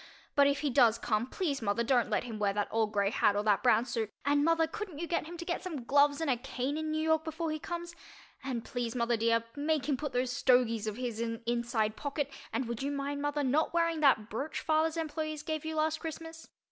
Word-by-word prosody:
But 280 Hz, -1 st, +5 dB
if 280 Hz, 0 st, +1 dB
he 290 Hz, -2 st, 0 dB
does 240 Hz, -4 st, +5 dB
come 230 Hz, +1 st, 0 dB
please 285 Hz, -2 st, -2 dB
mother 220 Hz, +2 st, 0 dB
don't 245 Hz, 0 st, +2 dB
let -, -, +1 dB
him 225 Hz, -3 st, -6 dB
wear 200 Hz, -1 st, +1 dB
that 205 Hz, 0 st, -1 dB
old 220 Hz, -1 st, +1 dB
gray 200 Hz, -1 st, +1 dB
hat 205 Hz, -, +3 dB
or 205 Hz, -, 0 dB
that 210 Hz, -2 st, +3 dB
brown 240 Hz, -2 st, +4 dB
suit, 225 Hz, -3 st, -2 dB, 0.2 s
and 285 Hz, 0 st, +3 dB
mother 330 Hz, +1 st, +3 dB
couldn't 360 Hz, 0 st, -6 dB
you 340 Hz, -, -3 dB
get 335 Hz, -2 st, -1 dB
him 345 Hz, +1 st, -8 dB
to 340 Hz, -, -6 dB
get 345 Hz, -, -2 dB
some 315 Hz, -9 st, -5 dB
gloves 285 Hz, +3 st, +4 dB
and 325 Hz, -, -1 dB
a 260 Hz, -3 st, +2 dB
cane 265 Hz, +2 st, -3 dB
in 315 Hz, 0 st, -2 dB
New 310 Hz, 0 st, -1 dB
York 320 Hz, 0 st, +2 dB
before 320 Hz, 0 st, -3 dB
he 310 Hz, -, -3 dB
comes? 345 Hz, 0 st, -5 dB, 0.5 s
And 250 Hz, -4 st, -3 dB
please, 240 Hz, -2 st, -3 dB
mother 235 Hz, -1 st, +1 dB
dear, 230 Hz, 0 st, +2 dB
make 295 Hz, -1 st, 0 dB
him 285 Hz, -3 st, +1 dB
put 295 Hz, -1 st, -4 dB
those 250 Hz, 0 st, 0 dB
"stogies" 245 Hz, -4 st, +2 dB
of 215 Hz, -, -2 dB
his 245 Hz, -3 st, -3 dB
in 230 Hz, -1 st, -1 dB
an 230 Hz, -, -14 dB
inside 235 Hz, -2 st, 0 dB
pocket 285 Hz, +1 st, -3 dB, 0.2 s
and 260 Hz, -, -1 dB
would 235 Hz, 0 st, -4 dB
you 275 Hz, -, -1 dB
mind, 285 Hz, 0 st, -3 dB
mother, 290 Hz, 0 st, -1 dB
not 295 Hz, +6 st, +1 dB
wearing 335 Hz, -1 st, +2 dB
that 265 Hz, -8 st, +4 dB
brooch 270 Hz, +7 st, -4 dB
father's 315 Hz, +1 st, +1 dB
employees 310 Hz, -1 st, -3 dB
gave 315 Hz, 0 st, -3 dB
you 315 Hz, 0 st, -3 dB
last 310 Hz, 0 st, +1 dB
Christmas? 325 Hz, 0 st, -7 dB
280 Hz, 245 wpm, -31 LUFS, 235-315 Hz, 0.5 s, But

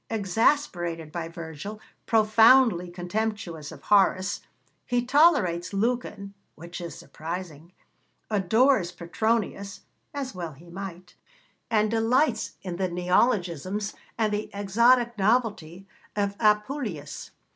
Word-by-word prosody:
Exasperated 185 Hz, -, 0 dB
by 165 Hz, 0 st, -4 dB
Virgil, 165 Hz, +5 st, -8 dB, 0.3 s
profoundly 220 Hz, -3 st, +5 dB
contemptuous 175 Hz, -3 st, -4 dB
of -, -, -12 dB
Horace, 195 Hz, -2 st, +3 dB, 0.4 s
he 245 Hz, 0 st, -1 dB
tolerates 250 Hz, -, +3 dB
Lucan 210 Hz, -2 st, -2 dB, 0.2 s
(which 170 Hz, +3 st, -9 dB
is 170 Hz, -4 st, -7 dB
surprising), 165 Hz, +2 st, -7 dB, 0.6 s
adores 215 Hz, 0 st, +2 dB
Petronius 200 Hz, +2 st, -2 dB, 0.3 s
(as 275 Hz, -3 st, -5 dB
well 170 Hz, -4 st, -6 dB
he 170 Hz, +5 st, -16 dB
might), 185 Hz, -1 st, -8 dB, 0.6 s
and 215 Hz, -2 st, +2 dB
delights 230 Hz, +2 st, +1 dB
in 180 Hz, -2 st, -5 dB
the 185 Hz, -1 st, -1 dB
neologisms 185 Hz, -, 0 dB, 0.2 s
and 215 Hz, -2 st, +1 dB
the 210 Hz, +1 st, -2 dB
exotic 235 Hz, +4 st, +3 dB
novelty 195 Hz, -5 st, 0 dB, 0.3 s
of 200 Hz, -1 st, -1 dB
Apuleius. 210 Hz, -, -1 dB
200 Hz, 105 wpm, -26 LUFS, 175-225 Hz, 0.6 s, profoundly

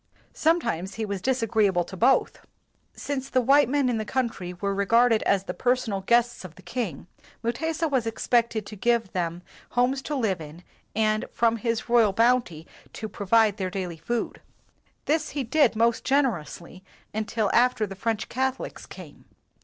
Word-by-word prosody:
Sometimes 230 Hz, -, 0 dB
he 220 Hz, -, -2 dB
was 200 Hz, -2 st, -4 dB
disagreeable 220 Hz, -7 st, +1 dB
to 190 Hz, -, -10 dB
both. 250 Hz, +8 st, +2 dB, 0.6 s
Since 275 Hz, -1 st, -4 dB
the 255 Hz, -, +2 dB
white 275 Hz, +2 st, +4 dB
men 280 Hz, -1 st, +2 dB
in 240 Hz, -3 st, 0 dB
the -, -, -1 dB
country 225 Hz, -7 st, -2 dB
were 195 Hz, +3 st, -3 dB
regarded 225 Hz, +3 st, +3 dB
as 195 Hz, -1 st, +2 dB
the -, -, -5 dB
personal 245 Hz, -6 st, 0 dB
guests 240 Hz, +3 st, +2 dB
of 175 Hz, -3 st, -10 dB
the 190 Hz, -, -16 dB
king, 180 Hz, -, -4 dB, 0.4 s
Mutesa 320 Hz, +8 st, -1 dB
was 260 Hz, -6 st, 0 dB
expected 230 Hz, -1 st, 0 dB
to 210 Hz, -, -9 dB
give 230 Hz, 0 st, +1 dB
them 175 Hz, -1 st, -3 dB, 0.3 s
homes 260 Hz, +2 st, +2 dB
to 295 Hz, -, -4 dB
live 210 Hz, -10 st, 0 dB
in 155 Hz, +3 st, -11 dB, 0.3 s
and 215 Hz, 0 st, +1 dB
from 230 Hz, -1 st, +2 dB
his 230 Hz, +1 st, -2 dB
royal 235 Hz, -4 st, +4 dB
bounty 230 Hz, -8 st, +1 dB, 0.3 s
to 220 Hz, -, -5 dB
provide 210 Hz, +1 st, +2 dB
their 190 Hz, -3 st, -2 dB
daily 180 Hz, -3 st, -4 dB
food. 235 Hz, +9 st, -3 dB, 0.6 s
This 310 Hz, +1 st, 0 dB
he 275 Hz, -, 0 dB
did 260 Hz, -1 st, +3 dB
most 230 Hz, +1 st, +2 dB
generously 185 Hz, -, -1 dB, 0.3 s
until 215 Hz, -1 st, -1 dB
after 245 Hz, -2 st, +3 dB
the 195 Hz, -, -8 dB
French 225 Hz, +2 st, -2 dB
Cath 265 Hz, +1 st, -1 dB
olics -, -, -9 dB
came. -, -, -12 dB
225 Hz, 165 wpm, -25 LUFS, 195-250 Hz, 0.6 s, white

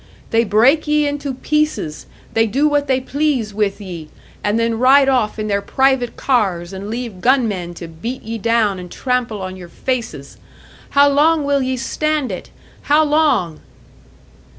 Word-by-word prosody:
They 230 Hz, 0 st, +3 dB
break 245 Hz, +10 st, +3 dB
ye 300 Hz, 0 st, +2 dB
into 285 Hz, -2 st, -3 dB
pieces, 300 Hz, -, -1 dB, 0.3 s
they 225 Hz, 0 st, +3 dB
do 275 Hz, +8 st, +2 dB
what 290 Hz, -1 st, +1 dB
they 260 Hz, -1 st, +2 dB
please 265 Hz, -5 st, -1 dB
with 205 Hz, -1 st, -1 dB
ye 175 Hz, -6 st, -8 dB, 0.3 s
and 205 Hz, +2 st, +1 dB
then 230 Hz, -1 st, 0 dB
ride 270 Hz, +2 st, +5 dB
off 245 Hz, -6 st, +1 dB
in 215 Hz, 0 st, -3 dB
their 200 Hz, -1 st, 0 dB
private 265 Hz, +2 st, +1 dB
cars, 195 Hz, -9 st, 0 dB
and 195 Hz, +2 st, -6 dB
leave 230 Hz, -5 st, -5 dB
gunmen 210 Hz, -9 st, +1 dB
to 170 Hz, -, -8 dB
beat 225 Hz, +11 st, -6 dB
ye 225 Hz, +1 st, -5 dB
down 220 Hz, -3 st, +1 dB
and 180 Hz, -1 st, -9 dB
trample 245 Hz, -6 st, -2 dB
on 185 Hz, 0 st, -5 dB
your 180 Hz, -2 st, -11 dB
faces! 225 Hz, -, -4 dB, 0.6 s
How 285 Hz, 0 st, +7 dB
long 300 Hz, +2 st, +3 dB
will 280 Hz, -1 st, +1 dB
ye 260 Hz, 0 st, -1 dB
stand 305 Hz, 0 st, -1 dB
it? 185 Hz, -, -7 dB, 0.3 s
How 300 Hz, +2 st, +3 dB
long?" 295 Hz, -, +1 dB
235 Hz, 165 wpm, -18 LUFS, 200-280 Hz, 0.6 s, How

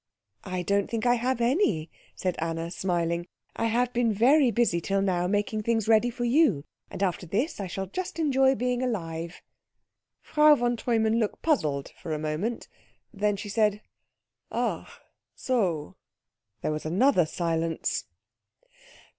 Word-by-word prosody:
"I 185 Hz, -1 st, -3 dB
don't 200 Hz, +2 st, +1 dB
think 230 Hz, 0 st, -2 dB
I 245 Hz, -, +5 dB
have 245 Hz, +1 st, 0 dB
any," 235 Hz, -, +1 dB, 0.2 s
said 185 Hz, -2 st, -2 dB
Anna, 165 Hz, +1 st, -3 dB
smiling. 170 Hz, -2 st, -1 dB, 0.3 s
"I -, -, -1 dB
have 245 Hz, +2 st, +1 dB
been 240 Hz, -1 st, +2 dB
very 255 Hz, +6 st, +4 dB
busy 230 Hz, -8 st, +1 dB
till 195 Hz, +3 st, 0 dB
now 180 Hz, -2 st, +1 dB
making 205 Hz, +2 st, 0 dB
things 225 Hz, -1 st, 0 dB
ready 225 Hz, +2 st, +4 dB
for 240 Hz, 0 st, -3 dB
you, 240 Hz, -, +3 dB, 0.2 s
and 200 Hz, -, -4 dB
after 180 Hz, -1 st, -1 dB
this 240 Hz, -, -1 dB
I 195 Hz, -, -3 dB
shall 190 Hz, +2 st, -4 dB
just 355 Hz, -, -5 dB
enjoy 270 Hz, -4 st, +3 dB
being 250 Hz, 0 st, -1 dB
alive." 170 Hz, -8 st, -4 dB, 0.8 s
Frau 300 Hz, 0 st, +5 dB
von 240 Hz, -2 st, 0 dB
Treumann 225 Hz, -1 st, +1 dB
looked 215 Hz, -3 st, -2 dB
puzzled 150 Hz, -, 0 dB
for 160 Hz, -, -4 dB
a -, -, -1 dB
moment. 155 Hz, +10 st, -3 dB, 0.5 s
Then 205 Hz, 0 st, 0 dB
she 210 Hz, -, -6 dB
said 210 Hz, 0 st, +1 dB, 0.7 s
"Ach -, -, -2 dB, 0.5 s
so." 185 Hz, -, -1 dB, 0.7 s
There -, -, 0 dB
was 155 Hz, +1 st, -3 dB
another 185 Hz, -, +3 dB
silence. 165 Hz, -1 st, -1 dB
210 Hz, 145 wpm, -27 LUFS, 175-245 Hz, 0.8 s, I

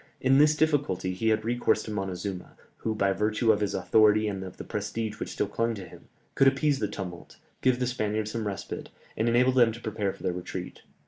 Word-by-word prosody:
In 135 Hz, +1 st, +4 dB
this 150 Hz, +1 st, +5 dB
difficulty 140 Hz, -, +1 dB
he 105 Hz, +5 st, -2 dB
had 110 Hz, 0 st, +1 dB
recourse 120 Hz, +1 st, +1 dB
to 110 Hz, -, -6 dB
Montezuma, 95 Hz, -2 st, -4 dB, 0.2 s
who, 110 Hz, -1 st, -2 dB
by 100 Hz, -2 st, +2 dB
virtue 105 Hz, +3 st, +2 dB
of 105 Hz, -, +2 dB
his 105 Hz, -1 st, -1 dB
authority 105 Hz, +3 st, +4 dB
and 100 Hz, -2 st, -3 dB
of 95 Hz, -, -9 dB
the -, -, -6 dB
prestige 105 Hz, +1 st, -4 dB
which -, -, -4 dB
still -, -, 0 dB
clung 115 Hz, +3 st, -1 dB
to 95 Hz, -4 st, -8 dB
him, -, -, -15 dB, 0.3 s
could 135 Hz, -, +4 dB
appease 140 Hz, +1 st, +2 dB
the 105 Hz, -, 0 dB
tumult, 90 Hz, -4 st, -8 dB, 0.2 s
give 130 Hz, -1 st, +3 dB
the 125 Hz, -, +1 dB
Spaniards 110 Hz, -3 st, -1 dB
some 115 Hz, -2 st, -3 dB
respite, 100 Hz, -1 st, -5 dB, 0.3 s
and 110 Hz, +2 st, +1 dB
enable 125 Hz, +2 st, +4 dB
them 120 Hz, -3 st, +4 dB
to 115 Hz, -, -9 dB
prepare 105 Hz, -3 st, -2 dB
for -, -, -14 dB
their 90 Hz, -2 st, 0 dB
retreat. 90 Hz, 0 st, -6 dB
110 Hz, 215 wpm, -28 LUFS, 95-120 Hz, 0.3 s, this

